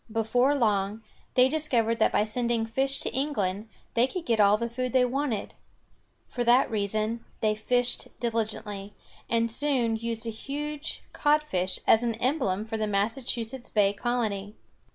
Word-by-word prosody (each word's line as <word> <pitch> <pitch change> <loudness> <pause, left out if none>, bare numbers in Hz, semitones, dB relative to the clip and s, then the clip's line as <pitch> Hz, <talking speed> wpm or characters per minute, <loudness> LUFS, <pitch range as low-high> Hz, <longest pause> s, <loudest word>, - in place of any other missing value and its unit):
Before 245 +5 +2
long, 210 -3 0 0.3
they 255 0 +6
discovered 250 -6 +1
that - - +4
by - - +3
sending 235 +1 0
fish 270 +4 0
to - - -2
England, 220 -7 -1 0.2
they 240 +2 +3
could 345 +4 -5
get 230 -2 +1
all 205 0 +6
the 235 +1 -2
food 250 +1 -3
they 255 -1 +5
wanted. 250 -4 -2 0.7
For 245 - -3
that 240 +1 +4
reason 215 +2 -1 0.2
they 215 -1 +3
fished 245 +3 0
diligently, 215 -3 -3 0.3
and 230 0 +1
soon 245 -3 +1
used 230 0 -3
a 230 - -2
huge 295 +6 -5
codfish 290 -12 +1
as 220 - +5
an 235 -2 -1
emblem 230 -5 0
for 225 0 -4
the 215 -1 -1
Massachusetts 230 +4 -1
Bay 205 -2 +3
colony. 210 -3 -2
230 Hz, 155 wpm, -27 LUFS, 215-255 Hz, 0.7 s, they